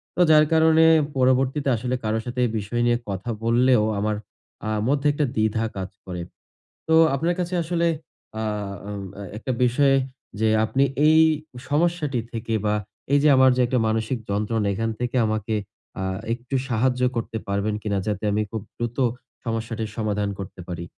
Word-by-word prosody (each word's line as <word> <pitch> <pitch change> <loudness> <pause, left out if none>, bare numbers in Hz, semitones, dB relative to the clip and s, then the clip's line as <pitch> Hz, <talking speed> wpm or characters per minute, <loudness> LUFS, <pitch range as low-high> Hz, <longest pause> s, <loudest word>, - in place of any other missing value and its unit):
তো 180 - +1
যার 155 -1 +7
কারণে 160 0 +5 0.3
পরবর্তীতে 130 +2 +2
আসলে 125 +3 -2
কারো 110 +1 0
সাথে 125 0 -4
এই 115 - -1
বিষয় 120 +4 -2
নিয়ে 120 0 +3
কথা 100 +5 -4
বললেও 120 0 +4 0.2
আমার 105 +1 0 0.5
আ - - 0 0.2
মধ্যে 145 +1 +2
একটা 150 0 +1
দ্বিধা 110 +1 +1
কাজ 95 -1 -4 0.2
করে। 90 -2 -5 0.7
তো 160 - +4 0.2
আপনার 165 +6 0
কাছে 180 +1 -2
আসলে 170 +1 0 0.5
আ - - -2 0.5
আম 100 -1 -5
অ্যা 100 - -8
একটা 125 +4 -3
বিষয় 135 +3 +3 0.5
যে 110 - +3 0.2
আপনি 135 +5 +2 0.2
এই 160 0 +6 0.5
সমস্যাটি 150 -4 +1
থেকে 115 0 -4
বা 105 - +2 0.4
এই 145 - +6
যে 150 - +5
আমার 130 0 +6
যে - - +1
একটা 125 +1 +1
মানসিক 110 +3 -1
যন্ত্রণা 105 +1 0
এখান 115 +2 -1
থেকে 125 +1 -2
আমাকে 110 0 -1 0.5
আ - - -2 0.3
একটু 120 +3 -8
সাহায্য 125 +1 +1
করতে 115 -1 -3
পারবেন 100 +1 0
কিনা? 100 -2 -1
যাতে 105 0 -2
আমি 105 - +1
খুব 110 -3 -4
দ্রুত 120 +2 -4 0.5
সমস্যাটির 115 -1 -3
সমাধান 105 -2 -1
করতে 95 -1 -8
পারি? 85 -1 -5
120 Hz, 165 wpm, -24 LUFS, 110-135 Hz, 0.7 s, যার